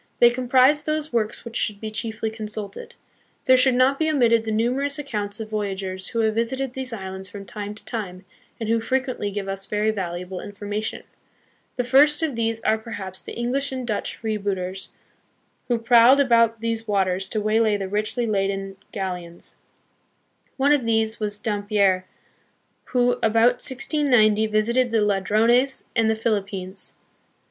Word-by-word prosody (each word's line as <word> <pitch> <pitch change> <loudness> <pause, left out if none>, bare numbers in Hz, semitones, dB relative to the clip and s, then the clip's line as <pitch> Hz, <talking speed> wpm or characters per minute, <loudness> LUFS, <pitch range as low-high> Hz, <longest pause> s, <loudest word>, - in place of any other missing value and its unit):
They 240 0 +6
comprise 255 +4 +3
those 310 -1 -2
works 230 0 -1
which 230 -1 -8
should 210 -2 0
be 220 0 -5
chiefly 220 0 -2
consulted. 220 - -6 0.5
There 260 - +6
should 255 0 +4
not 260 +2 +3
be 315 0 +1
omitted 235 -6 +3
the 220 - -2
numerous 255 +6 0
accounts 210 -7 -4
of 220 -1 -7
voyagers 190 -3 -3
who 230 - -1
have 220 -1 +2
visited 250 +3 -1
these 260 -1 -4
islands 190 -3 -6
from 200 +1 -9
time 205 +1 -6
to - - -11
time, 190 -5 -5 0.3
and 225 - -3
who 230 +1 +2
frequently 255 -2 -1
give 200 -1 -4
us 195 0 -4
very 210 +1 +1
valuable 180 -2 -5
information. 205 +1 -5 0.7
The 250 - 0
first 290 +6 +4
of 300 -6 -1
these 225 -1 -1
are 220 0 +1
perhaps 195 -4 -7
the - - -9
English 260 +4 -1
and 260 -1 -4
Dutch 215 -3 -3
freebooters, 195 -4 -3 0.8
who 240 - +1
prowled 235 +3 +6
about 230 -4 +3
these 230 0 -2
waters 190 -2 0
to 215 - -1
waylay 215 0 +2
the 195 -1 -4
richly 215 +4 -1
laden 195 -2 -2
galleons. 180 -3 -6 1.0
One 280 +1 +3
of 290 -4 +3
these 225 -1 0
was 205 -1 -1
Dampier, 205 -3 +1 0.8
who, 245 -1 +1
about 230 +3 +3
1690, 245 -6 +3
visited 235 +4 +1
the 225 -2 +2
Ladrones 220 +7 +2
and 225 -2 +3
the 220 - +2
Philippines. 200 -4 -3
220 Hz, 155 wpm, -23 LUFS, 205-245 Hz, 1.0 s, They